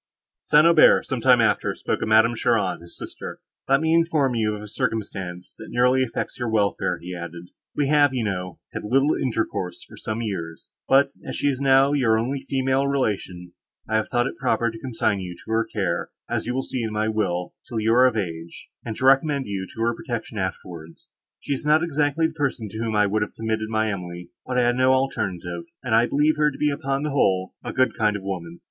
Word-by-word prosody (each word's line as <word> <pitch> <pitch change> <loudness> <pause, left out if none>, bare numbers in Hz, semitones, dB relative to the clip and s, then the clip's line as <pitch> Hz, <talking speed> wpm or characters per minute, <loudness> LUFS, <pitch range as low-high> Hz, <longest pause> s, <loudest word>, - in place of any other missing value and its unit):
St. 150 +1 +5
Aubert, 170 -2 +6
some 130 -3 -3
time 125 0 +5
after, 105 -2 +1
spoke - - -2
of - - -1
Madame 110 +2 +5
Cheron, 110 -7 0
his 85 0 -9
sister. - - -7 0.3
"Let 135 +1 +4
me 160 0 +2
inform 160 -6 +2
you 110 -2 0
of 105 - -8
a - - -8
circumstance, 95 -4 -4
that - - -9
nearly 125 +2 +3
affects 130 0 -3
your 120 -2 -1
welfare," 105 -2 0
he 90 +1 -8
added. 85 0 -8 0.2
"We 145 - +1
have, 145 -2 +5
you 125 -3 -1
know, 90 -4 -3 0.2
had - - -5
little 135 +7 +2
intercourse 110 -7 -2
for - - -15
some 110 +2 -4
years, 85 -7 -5 0.2
but, 135 +1 +5
as - - -6
she 145 - +1
is 135 -1 -2
now 135 +1 +4
your 120 -6 +3
only 130 +5 -1
female 135 0 0
relation, 95 -10 -2 0.3
I 110 - +1
have 110 - -1
thought 120 0 +1
it - - -5
proper 120 -3 +1
to 115 - -10
consign 110 -4 -1
you 90 -2 -6
to 85 +6 -11
her 115 0 +2
care, - - -2 0.2
as - - -2
you 125 - -1
will 130 - -1
see 130 - -3
in 110 -1 -2
my 110 +1 0
will, 95 -5 -1 0.2
till 115 - -2
you 110 +1 +2
are 125 +2 +6
of 120 -3 -1
age, 85 -4 -5
and 110 - -5
to 130 - -2
recommend 135 +1 +4
you 95 -2 -4
to 115 - -7
her 115 +1 +2
protection 120 -9 -5
afterwards. 85 -3 -6 0.3
She - - -2
is 135 - -4
not 155 +2 +4
exactly 150 -1 +1
the 160 - -1
person, 135 -8 -2
to 110 - -7
whom 115 -1 -2
I 105 0 +4
would 105 +2 0
have 105 - -3
committed 110 -1 -2
my 110 -1 0
Emily, 90 -2 -7 0.2
but 125 - -1
I 125 - +4
had 120 0 +2
no 130 +1 +4
alternative, 90 -10 -2 0.2
and 125 -3 -2
I 115 +2 +5
believe 150 +2 +2
her 150 0 +3
to 140 - -9
be 150 -1 +1
upon 135 0 -2
the 150 - -2
whole—a 95 -9 0
good 130 0 +2
kind 105 -2 +1
of 100 - -5
woman. 85 -3 -5
115 Hz, 225 wpm, -23 LUFS, 100-135 Hz, 0.3 s, Aubert